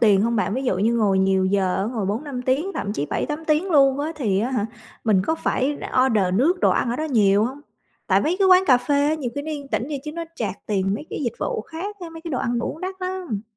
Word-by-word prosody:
tiền 205 -4 +5
hông 230 +1 +1
bạn? 205 -1 0
Ví 265 - -2
dụ 245 - +1
như 225 +4 +2
ngồi 205 -4 +2
nhiều 190 0 +2
giờ 185 -1 +1
á, - - 0
ngồi 220 -3 -2
4-5 250 +5 -3
tiếng, 275 +10 0
thậm 205 - -3
chí 145 -8 -2
7-8 300 +1 -3
tiếng 315 +5 +1
luôn 275 -3 +4
á 310 +3 -2
thì 205 -9 0
á 240 +4 -1
hả, 245 -5 0 0.4
mình 205 -5 +3
có 320 - +2
phải 285 -2 -1 0.3
order 215 -6 +2
nước 325 - +2
đồ - - +4
ăn 235 - +1
ở 240 - -1
đó 310 - -2
nhiều 210 -8 +3
hông? 265 +5 -5 0.5
Tại - - +3
mấy 335 +4 0
cái 390 -1 +4
quán 370 0 +7
cà 255 -2 +6
phê 250 +4 -1
á, 310 - +2
nhiều 270 -6 -4
khi 285 - -3
nó 310 - -5
yên 285 -2 -6
tĩnh - - -1
vậy 290 -3 -4
chứ 300 - -5
nó 335 0 -4
charge 205 - -3
tiền 195 -2 0
mấy 300 +9 -6
cái - - -4
dịch 235 - -1
vụ - - -2
khác 345 - -7
á, 345 -2 -7
mấy 325 - -9
cái 335 - -6
đồ 255 - -1
ăn 240 0 -1
uống 305 - -4
đắt 375 +1 -4
lắm! 365 - -3
255 Hz, 280 wpm, -23 LUFS, 210-310 Hz, 0.5 s, quán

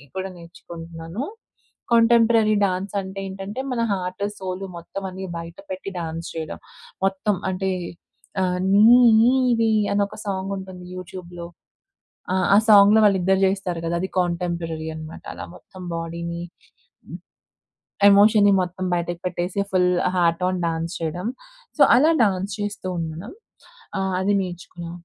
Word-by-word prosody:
కూడా 190 0 -3
నేర్చుకుంటున్నాను. 170 +3 -8 0.7
Contemporary 230 -2 +5
dance 190 +2 -3
అంటే 190 0 -8
ఏంటంటే, 195 +5 -6
మన 240 - -1
హార్ట్, 185 0 -3
సోల్ 190 0 -5
మొత్తం 170 +3 -7
అన్నీ 190 +1 -7
బయట 170 +1 -8
పెట్టి 185 +1 -5
డాన్స్ 165 0 -5
చేయడం. 160 -2 -5 0.5
మొత్తం 195 +1 0
అంటే, 190 +1 -1 0.7
ఆహ్, 180 -1 0
'నీవే' 230 +2 +5 0.2
అని 200 0 +2
ఒక - - -11
సాంగ్ 195 -1 -3
ఉంటుంది 185 -1 -9
యూట్యూబ్‍లో. 175 -1 -8 1.1
ఆ - - +7
సాంగ్‌లో 205 0 +7
వాళ్ళిద్దరూ 190 -1 +2
చేస్తారు 190 -3 -2
కదా! 165 - -1
అది 190 - -2
కాంటెంపరరీ 170 -2 -2
అనమాట. 155 0 -9
అలా - - -7
మొత్తం 185 - -13
బాడీని, 170 +1 -4 1.7
ఎమోషన్‌ని 205 0 +6
మొత్తం 185 +1 -4
బయటకు 175 0 -3
పెట్టేసి, 180 +2 -2
ఫుల్ 180 -1 +3 0.3
హార్ట్ 170 0 +2
ఆన్ 185 0 -2
డాన్స్ 165 +1 -3
చేయడం. 175 +5 -3 0.5
సో, - - +3 0.2
అలా 305 +6 +5
డాన్స్ 195 0 -1
చేస్తూ 205 -2 -4
ఉండడం. 165 - -6 0.7
ఆ! - - 0 0.2
అది 200 +2 +1
నేర్చుకున్నా. 175 -1 -8
185 Hz, 125 wpm, -23 LUFS, 170-200 Hz, 1.7 s, ఆ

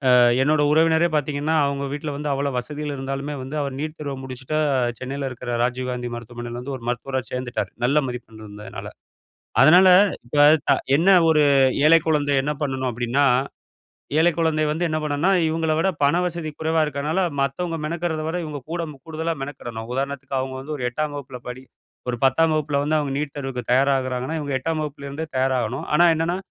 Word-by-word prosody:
அ - - +6 0.3
என்னோட 150 +2 +2
உறவினரே 160 +2 +4
பார்த்தீங்கன்னா, 150 +1 0
அவங்க 140 0 -2
வீட்ல 150 +1 -4
வந்து 150 0 -2
அவ்வளோ 140 +1 -1
வசதிகள் 150 +3 -5
இருந்தாலுமே 135 +2 -4
வந்து 135 +4 -5
அவர் 135 -1 -5
நீட் 155 +1 -4
தேர்வு 140 -2 -4
முடிச்சுட்டு, 130 +4 -4 0.4
சென்னையில 135 +1 -4
இருக்கிற 120 -1 -4
ராஜீவ்காந்தி 125 -1 -2
மருத்துவமனையில 120 +1 -7
வந்து 135 +2 -5
ஒரு 115 - -12
மருத்துவரா 130 +2 -2
சேர்ந்துட்டார். 125 -1 -3
நல்ல 145 +4 +3
மதிப்பெண் 115 -3 -9
இருந்ததுனால. 105 0 -9 0.8
அதனால 180 +6 +7 0.4
இப்ப 125 - -5 0.3
த - - +5 0.2
என்ன 165 +7 +3 0.2
ஒரு 155 -2 +4 0.4
ஏழை 165 +2 +7
குழந்தை 150 -2 +1
என்ன 150 +2 -1
பண்ணனும் 130 -2 -1
அப்படீன்னா, 120 +4 +1 0.9
ஏழை 165 +2 +5
குழந்தை 160 -2 +1
வந்து 160 +3 -1
என்ன 155 0 -1
பண்ணனும்ன்னா 150 +4 +1 0.2
இவங்கள 160 0 0
விட 170 - +2
பண 145 +4 +4
வசதி 170 -3 -4
குறைவா 160 0 +1
இருக்கனால 150 +4 -1 0.2
மத்தவங்க 165 +5 -1
மெனக்கெடுறதை 160 0 -2
விட 165 +2 -2
இவங்க 150 -2 -6
கூட 170 0 -2 0.2
கூடுதலா 160 +1 -2
மெனக்கெடணும். 120 -5 -7
உதாரணத்துக்கு 135 +1 -3
அவங்க 130 0 -3
வந்து 150 +3 -5
ஒரு 135 - -7
8ஆம் 150 +4 -3
வகுப்புல 135 -3 -7
படி 125 +1 -7 0.5
ஒரு 120 - -1
10ஆம் 155 +5 +3
வகுப்பில 150 -2 0
வந்து 155 +2 +1
அவங்க 145 -2 -2
நீட் 145 -1 -4
தேர்வுக்கு 135 -3 -4
தயாராகுறாங்கன்னா, 130 +2 +1
இவங்க 145 -2 -4
8ஆம் 160 +4 -2
வகுப்பிலருந்தே 145 +1 -6
தயாராகணும். 130 -1 0
ஆனா 170 - +6
என்னன்னா, 165 +2 -1
140 Hz, 170 wpm, -22 LUFS, 130-155 Hz, 0.9 s, அதனால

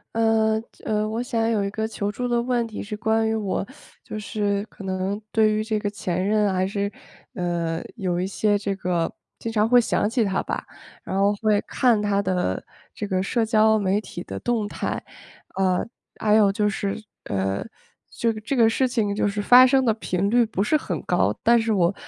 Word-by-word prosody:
呃， 225 -1 +3 0.3
呃， 215 0 0
我 225 +2 -2
想 230 -2 0
有 220 -3 +1
一 - - -1
个 220 +1 -2
求 210 -2 -3
助 245 +4 -4
的 240 -1 +1
问 240 -1 0
题， 220 - -6
是 210 +1 -5
关 220 +1 +1
于 220 - 0
我， 200 -2 -2 0.3
就 - - -7
是 205 -1 -1
可 - - -14
能 190 +2 -2
对 220 -1 +4
于 215 0 0
这 215 0 -1
个 205 -1 -2
前 185 -3 -2
任 210 -1 +2
还 185 0 +1
是， 200 +1 -2 0.4
呃， 170 -4 -2
有 180 -4 -1
一 180 - 0
些 205 +2 +1
这 200 -1 -2
个 175 -3 -1 0.3
经 230 - -4
常 215 -1 +2
会 245 +1 +6
想 215 - 0
起 235 0 +1
他 195 -2 0
吧， - - -4 0.4
然 190 - -3
后 200 +1 +3
会 215 -2 +3
看 235 -5 +2
他 205 -1 +1
的 180 - -1 0.3
这 210 - -4
个 190 -2 0
社 225 +5 0
交 220 0 +4
媒 200 -1 +1
体 175 -4 -8
的 - - -6
动 235 -3 0
态。 - - -3 0.5
呃， 185 -1 +1 0.3
还 210 -1 +3
有 210 -2 +5
就 210 +1 +1
是 195 0 -2 0.3
呃， 95 0 -1 0.5
就 230 - 0
这 225 +6 -3
个 230 -3 +5
事 260 +3 +1
情 220 -5 0
就 205 - +1
是 205 +1 -2
发 250 +4 +8
生 265 0 +3
的 230 -3 +3
频 195 -3 -1
率 240 +2 +4
不 205 -3 -1
是 305 +9 +3
很 - - -4
高， - - +1
但 235 0 +5
是 225 -1 0
我 180 -2 +2
210 Hz, 220 characters per minute, -24 LUFS, 195-225 Hz, 0.5 s, 发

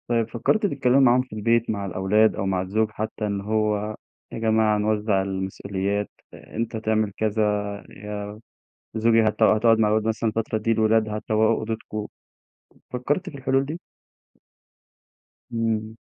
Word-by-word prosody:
طيب 115 -2 0
فكرتِ 170 - 0
تتكلّمي 135 -7 +2
معاهم 125 -1 +5
في 130 -3 -11
البيت 115 +2 +1
مع 100 -2 -2
الأولاد 100 +4 +2
أو 95 - -2
مع 95 -1 0
الزوج 105 +4 0
حتّى، 110 0 -4
إن 100 -1 -2
هو 105 0 0 0.4
يا - - -5
جماعة 110 -1 +2
نوزّع 105 -1 +1
المسؤوليات، 95 +1 -3 0.2
أ - - -14
أنت 115 0 -2
تعمل 110 -1 0
كذا 110 0 0 0.5
يا 105 +1 -7 0.6
زوجي 115 0 +4
هت 110 -1 +1
هتقعد 110 +1 +4
مع 110 - +4
الولاد 110 +1 +1
مثلًا 110 0 0
الفترة 110 0 -2
دي، 110 +1 0
الولاد 110 0 +2
هتروّقوا 110 +1 +1
أوضتكم، 110 -1 -4 0.9
فكرتِ 145 +9 -1
في 140 - -10
الحلول 135 0 +1
دي؟ 155 +5 -5 1.7
إمم. 110 -1 -1
110 Hz, 145 wpm, -24 LUFS, 105-115 Hz, 1.7 s, معاهم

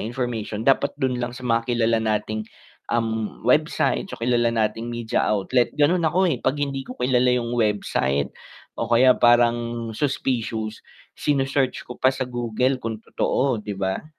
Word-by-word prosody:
information 115 -2 -3
dapat 135 +1 +2
dun 125 -2 -1
lang 120 0 -4
sa 130 - -9
mga 115 0 0
kilala 115 -1 +2
nating, 110 0 -2 0.4
uhm, 110 -2 -2
website 150 +8 +2
so - - -7
kilala 120 0 +1
nating 115 0 -1
media 120 0 -1
outlet, 105 +4 +2
ganun 165 +4 +3
ako 180 +4 +2
eh, 130 -7 -1
'pag 140 - 0
hindi 140 -1 -2
ko 125 - -7
kilala 125 0 +2
yung 120 -1 -2
website 100 - 0 0.5
o - - -2
kaya 125 +2 +6
parang 120 -1 +2
suspicious, 115 -4 -2 0.3
sini 140 -3 0
search 135 -1 -1
ko 125 - -10
pa 130 - +5
sa 130 0 -1
Google 125 +1 -1
kung 115 -2 -3
totoo, 130 -4 0
'di 105 -1 -6
ba? 95 +4 -2
120 Hz, 160 wpm, -23 LUFS, 110-130 Hz, 0.5 s, kaya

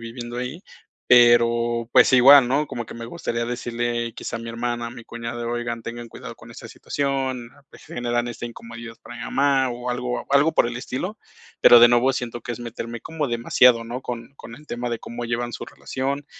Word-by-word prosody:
viviendo 120 +1 -7
ahí, 130 +9 -5 0.4
pero 120 -1 +4
pues, - - +6
igual, 130 0 +8
¿no? 145 +3 +1
Como 120 -3 -5
que - - -10
me 115 0 -7
gustaría 120 -5 -3
decirle 120 -1 -3
quizá - - -6
a - - -6
mi 115 - -7
hermana, 120 0 -3
a - - -6
mi 120 -2 -11
cuñado, 120 0 -6
oigan, 120 -1 -3
tengan 120 0 -7
cuidado - - -9
con - - -15
esta - - -10
situación, 135 -4 -3 0.2
pues, - - -16
generan 120 0 -2
esta 120 0 -6
incomodidad 115 -1 -9
para 120 - -11
mi - - -7
mamá, 135 -2 +2
o 120 +1 -6
algo 125 0 -3
algo 145 +3 +4
por 120 - +3
el 120 0 -4
estilo, 160 - -5 0.4
pero, 120 - +9
de 120 - +9
nuevo 120 +2 +3
siento 120 -2 -4
que - - -7
es 120 - -4
meterme 120 0 -6
como 155 0 -3
demasiado, 120 0 +4
¿no?, 125 +3 -6
con 120 +2 -7
con 115 -3 -11
el 150 +1 -17
tema 120 0 -4
de 115 - -2
cómo 120 +1 -7
llevan 120 +1 -2
su - - -6
relación, 140 +2 -4
120 Hz, 205 wpm, -23 LUFS, 120-125 Hz, 0.4 s, pero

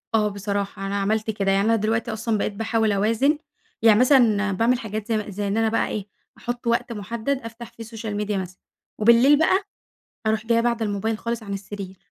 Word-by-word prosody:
آه 215 -1 +3
بصراحة 200 -1 -3
أنا 200 - -3
عملت 215 +2 0
كده، 195 -2 0
يعني 195 +1 +2
أنا 225 +1 +4
دلوقتي 225 +1 -1
أصلًا 220 0 -1
بقيت 205 - -2
باحاول 225 +1 0
أوازن، 225 +9 +2 0.4
يعني 220 -2 +6
مثلًا 235 -6 +4
باعمل 230 +6 +2
حاجات 215 -1 -5
زي 215 -2 -1
زي 205 +1 -3
إن 200 +2 -1
أنا 225 0 +2
بقى 230 - +1
إيه 205 -2 -4 0.3
أحط 240 0 -5
وقت 235 0 +1
محدد 230 +6 -3
أفتح 230 0 -9
فيه 230 -1 -10
social 225 -1 -6
media 210 0 -3
مثلًا، 185 -1 -6 0.4
وبالليل 235 +6 +6
بقى 375 +5 +3 0.6
أروح 220 +1 0
جايّة 230 0 +3
باعدة 235 -1 0
الموبايل 210 +2 -2
خالص 235 0 -3
عن 200 -2 -7
السرير، 195 -1 -7
220 Hz, 195 wpm, -23 LUFS, 205-230 Hz, 0.6 s, يعني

